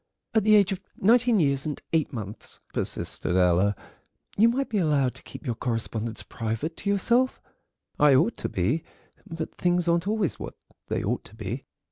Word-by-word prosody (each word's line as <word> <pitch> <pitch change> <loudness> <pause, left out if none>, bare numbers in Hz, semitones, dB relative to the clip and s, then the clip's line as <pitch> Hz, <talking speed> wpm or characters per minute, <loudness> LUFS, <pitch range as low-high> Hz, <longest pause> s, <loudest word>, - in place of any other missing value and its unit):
"At 220 -2 +3
the 215 +1 +6
age 200 -2 +5
of 195 0 -3 0.2
nineteen 235 +1 +4
years 140 -3 +1
and 150 - -3
eight 160 -3 +2
months," 105 -4 -7
persisted 90 - -2
Ella, 90 +3 +3 0.6
"you 225 +3 +5
might 265 +3 0
be 215 - 0
allowed 145 -7 +2
to - - -11
keep - - -11
your 120 - 0
correspondence 115 -1 -3
private 115 +9 -3
to 200 - -3
yourself." 235 +6 +2 0.6
"I 145 -2 +6
ought 210 - +3
to - - -3
be, 120 - 0 0.5
but 165 -1 -5
things 175 -1 +1
aren't 170 +2 +2
always 210 -5 0
what - - -7 0.3
they - - -1
ought - - -1
to 110 - -13
be. 110 +4 -5
155 Hz, 175 wpm, -26 LUFS, -, 0.6 s, the